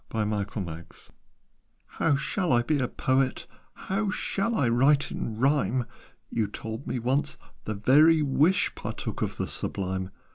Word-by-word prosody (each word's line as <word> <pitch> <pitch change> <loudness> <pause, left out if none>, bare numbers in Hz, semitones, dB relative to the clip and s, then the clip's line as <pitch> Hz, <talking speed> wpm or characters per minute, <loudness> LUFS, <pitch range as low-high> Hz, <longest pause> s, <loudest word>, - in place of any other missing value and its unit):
"How 105 - -4
shall 180 +5 -1
I 120 -1 +4
be 150 +3 +1
a 125 - +1
poet? 130 +1 0 0.3
How 195 +2 -2
shall 210 +2 -1
I 135 - +2
write 135 +5 +3
in 110 -1 -4
rhyme? 130 -2 +2 0.5
You 110 -3 0
told 110 +5 -7
me - - -2
once 130 +4 0 0.3
'the 110 - -3
very 150 +9 +5
wish 150 +6 +2
Partook - - -5
of - - -2
the - - -1
sublime.' 95 -1 -3
130 Hz, 135 wpm, -27 LUFS, 110-150 Hz, 0.5 s, very